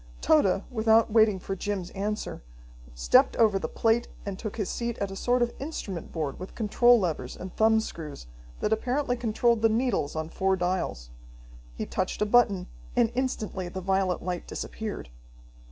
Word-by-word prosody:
Tode, 180 - +3
without 225 -1 +3
waiting 215 -3 +5
for 195 +1 -4
Jim's 195 -2 -3
answer, 210 +2 -3 0.5
stepped - - +4
over 215 -4 +4
the - - -3
plate 230 +1 +1 0.2
and 200 -2 -5
took 215 -1 -5
his 205 -4 -1
seat 235 -1 -3
at 200 -1 -3
a - - -6
sort 245 +4 +2
of 240 - -2
instrument 210 - -5
board 155 -4 -3
with 185 - -8
control 240 +2 +4
levers 160 -9 -3
and 185 0 -8
thumb 220 0 +4
screws 155 - -7 0.4
that 215 - +2
apparently 245 +3 0
controlled 235 -1 +1
the 225 - +5
needles 225 - 0
on 155 0 -2
four 190 +2 +1
dials. 175 - -2 0.6
He - - -3
touched 185 - -2
a 210 - +2
button, 210 -5 +3 0.3
and 240 -2 +3
instantly 220 -8 -2
the 190 - -5
violet 190 -1 0
light 180 -1 -4
disappeared. 215 - -5
205 Hz, 170 wpm, -27 LUFS, 185-230 Hz, 0.6 s, waiting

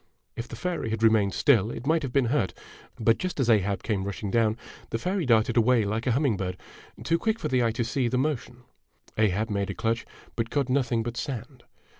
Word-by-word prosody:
If 115 - -5
the 120 - -8
fairy 175 -3 -3
had 110 0 -2
remained 110 -3 +4
still 115 -7 +4
it 120 - -6
might 160 +2 +2
have 135 -4 -4
been 135 0 +2
hurt; 120 -11 0 0.4
but, 115 0 +3
just 185 -4 -3
as 120 -3 +3
Ahab 100 -2 +1
came 105 -4 -1
rushing 100 0 -4
down, 115 -1 +2 0.3
the 115 - -1
fairy 180 - -1
darted 115 -1 +3
away 115 -1 +4
like 110 +4 -2
a - - +3
humming 130 -5 +1
bird, 90 -1 -3 0.5
too 165 0 +1
quick 220 +3 0
for - - -3
the 130 -1 +2
eye 115 - +2
to 120 - -1
see 120 +2 0
the 125 - 0
motion. 125 -3 -2 0.5
Ahab 110 +1 +1
made 100 -1 -1
a 100 - -4
clutch, 115 0 -1 0.3
but 115 -1 -1
caught 140 -1 0
nothing 125 -3 +1
but 120 +1 -5
sand. 125 -2 -6
115 Hz, 220 wpm, -27 LUFS, 110-135 Hz, 0.5 s, remained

